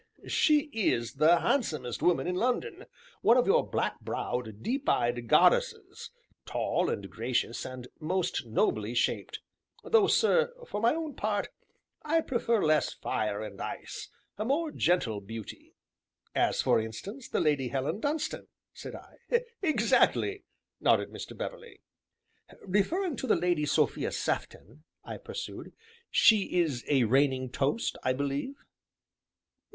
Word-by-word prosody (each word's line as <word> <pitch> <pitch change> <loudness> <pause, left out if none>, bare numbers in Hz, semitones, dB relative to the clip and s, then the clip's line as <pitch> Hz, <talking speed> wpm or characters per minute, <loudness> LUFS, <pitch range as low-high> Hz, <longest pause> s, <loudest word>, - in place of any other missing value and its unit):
"She 300 -1 +3
is 120 - 0
the 165 +4 +5
handsomest 155 - -1
woman 165 -7 +2
in 180 - -1
London, 355 - -1 0.4
one 235 - +5
of 250 - +4
your 470 +4 +3
black - - -1
browed, 110 -4 -4
deep 270 +3 -1
eyed 120 0 +1
goddesses, - - +2 0.3
tall, - - -1
and 100 - -3
gracious, 115 +2 -2
and 130 -1 -7
most 170 -5 -1
nobly 110 0 0
shaped; - - -1 0.4
though, 445 -3 +4
sir, 485 +3 +3
for 205 - -4
my 235 +6 +3
own 320 -3 -4
part, 210 -3 -1 0.5
I 325 +2 +2
prefer 235 -5 0
less 155 -2 +3
fire 105 0 -2
and 100 -2 -8
ice - - -6 0.3
and 215 - -2
more 305 +4 0
gentle 125 - +1
beauty." 110 +2 -9 0.6
"As, - - +1
for - - +4
instance, 110 - -7
the - - 0
Lady 145 -4 +1
Helen 135 - -2
Dunstan?" 295 +4 -2 0.3
said - - -8
I. 475 0 -3 0.2
"Exactly!" 400 +3 +2 0.3
nodded - - +2
Mr. - - -8
Beverley. 475 -2 -7 0.9
"Referring 280 - 0
to 260 - -4
the - - +4
Lady 175 -4 +1
Sophia - - +1
Sefton," 130 - -4 0.2
I - - -7
pursued, 465 -1 -7 0.4
"she 210 -5 +4
is 145 -8 0
a 135 -4 +4
reigning 130 +1 +2
toast, 140 - -1
I 130 - +1
believe?" 140 - -2
175 Hz, 135 wpm, -29 LUFS, -, 0.9 s, the